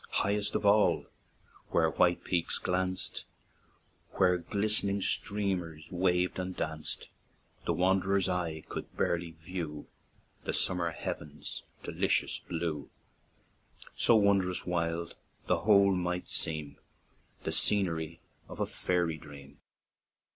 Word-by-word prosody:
Highest 100 +1 +1
of - - 0
all, 105 +1 +4 0.6
where 80 -1 +3
white 90 -1 +3
peaks 85 -2 0
glanced, 90 0 -2 0.9
Where 90 -1 +3
glist'ning 100 +1 +2
streamers 90 -6 0
waved 90 0 +1
and 90 0 -4
danced, 80 -1 -4 0.6
The - - +2
wanderer's 95 +1 +2
eye 85 -4 -2
could - - -7
barely 85 0 0
view 80 -2 -6 0.6
The - - -2
summer 90 -2 +1
heaven's 75 -2 -6 0.2
delicious - - +1
blue; 80 -4 -3 1.1
So 115 - +5
wondrous 100 -3 +3
wild, 85 -1 -1 0.3
the - - +2
whole 100 -2 +6
might 90 -1 -1
seem 75 -3 -2 0.6
The - - -2
scenery 85 -5 +1 0.3
of - - -9
a - - +2
fairy 85 -3 -1
dream." 70 -2 -13
90 Hz, 110 wpm, -31 LUFS, 80-95 Hz, 1.1 s, whole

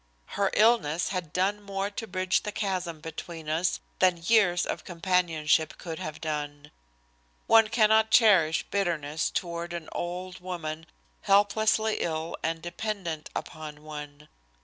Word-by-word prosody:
Her 200 -1 +1
illness 210 -8 +3
had 180 -5 -4
done 195 +4 0
more 200 0 -3
to 225 +2 -5
bridge 185 -1 +1
the 210 - -4
chasm, 185 -6 -3
between 160 0 -7
us 165 +4 0 0.2
than 180 -3 +3
years 180 -5 +4
of - - -4
companionship 165 -3 +1
could 165 -2 -6
have 155 -1 -6
done. 150 -1 -4 0.7
One 225 -1 +6
cannot 220 0 +4
cherish 190 -9 +5
bitterness 160 -6 0
toward 170 -1 -3
an 170 -2 -6
old 180 +1 -5
woman 165 -3 -5 0.3
helplessly 215 +2 +3
ill 160 0 -2
and 165 0 -2
dependent 175 -3 -4
upon 150 -1 -7
one. 150 -1 -9
175 Hz, 130 wpm, -28 LUFS, 160-200 Hz, 0.7 s, One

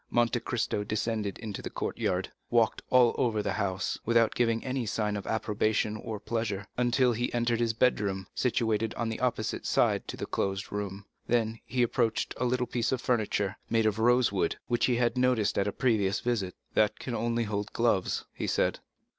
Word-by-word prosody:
Monte 120 0 +2
Cristo 110 -3 -1
descended 110 -1 -2
into 110 -3 -6
the - - -5
courtyard, 90 +1 -2 0.2
walked 115 -1 +2
all 125 -2 +5
over 110 -4 +1
the 100 - -1
house, 95 -2 -1
without 115 -1 +3
giving 115 0 +1
any 130 -3 -2
sign 105 -1 -1
of 100 - -5
approbation 110 -1 0
or 110 0 -5
pleasure, 105 -2 -2
until 125 0 +3
he 120 +2 -1
entered 120 -1 +1
his 115 -1 +1
bedroom, 100 -6 +1
situated 115 -3 0
on 115 -1 -1
the 110 - -4
opposite 120 -4 -1
side - - +2
to - - -6
the - - -3
closed 95 0 -2
room; 100 -1 -4 0.2
then 115 -1 +1
he 125 0 +1
approached 115 -2 0
a - - 0
little 125 0 +1
piece 120 -2 -1
of 130 - 0
furniture, 105 -5 0
made 115 -1 +2
of 110 0 +1
rosewood, 120 -4 +3
which 120 -1 +1
he 125 - +2
had 120 +1 +1
noticed 125 -5 +2
at 100 - +1
a - - 0
previous 105 -5 +1
visit. 105 -7 -1 0.2
"That 105 -1 +2
can 125 - -5
only 115 0 0
be - - -4
to 105 - -6
hold 105 0 -2
gloves," 115 -6 +1
he - - -4
said. - - +1
115 Hz, 190 wpm, -29 LUFS, 105-120 Hz, 0.2 s, all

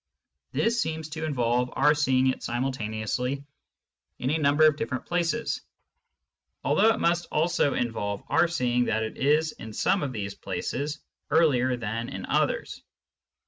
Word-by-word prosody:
This 235 0 +1
seems 160 -1 -3
to 160 +1 -4
involve 125 -4 +1
our 150 - +4
seeing 130 -3 +2
it 130 - +1
simultaneously 125 +1 -2 0.7
in 130 - -1
a 160 - +1
number 145 +1 +4
of 130 -5 +1
places, 175 +6 -1 1.0
although 215 +3 +4
it 225 - -1
must 175 0 +1
also 160 -2 +2
involve 100 -4 -2
our 175 - +3
seeing 125 -7 +1
that 110 -1 0
it 110 - -5
is 155 +3 +2
in 110 -6 -10
some 190 - +1
of 140 - -2
these 100 -4 -4
places 145 +3 -4 0.3
earlier 130 -6 +3
than 115 +1 -3
in - - -6
others. - - 0
135 Hz, 145 wpm, -27 LUFS, 120-160 Hz, 1.0 s, our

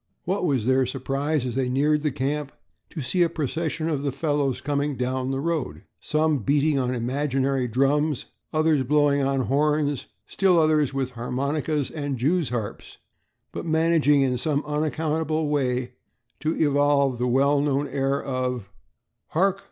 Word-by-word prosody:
What 185 +1 -1
was 135 -9 +1
their 130 0 +3
surprise 135 +2 -1
as 125 - -3
they 130 0 0
neared 150 +4 +2
the 150 - +1
camp 140 +1 -2 0.4
to 160 - -6
see 175 +9 0
a 170 - +4
procession 160 +2 -2
of 150 -4 -1
the 140 -1 -1
fellows 140 -2 0
coming 145 0 -1
down 130 +1 -1
the 135 0 -1
road, 140 - -2 0.2
some 155 -1 +1
beating 140 +5 +2
on 125 -1 -1
imaginary 135 +1 0
drums, 140 +4 +1 0.3
others 155 -2 +2
blowing 145 +1 +2
on 135 0 +1
horns, 145 +1 0 0.2
still 190 -3 +2
others 155 -3 +3
with 135 -2 -2
harmonicas 140 +4 -2
and 145 -3 -3
jewsharps, 125 - -2 0.5
but - - -5
managing 160 -3 +3
in 125 -2 0
some 150 +1 0
unaccountable 155 +1 -1
way 125 -4 -1 0.5
to 155 +2 -1
evolve 145 -3 +2
the 125 - +1
well 140 +3 +3
known 145 0 0
air 135 0 0
of 125 -6 -3 0.6
"Hark! 195 +4 +1
140 Hz, 150 wpm, -24 LUFS, 130-155 Hz, 0.6 s, a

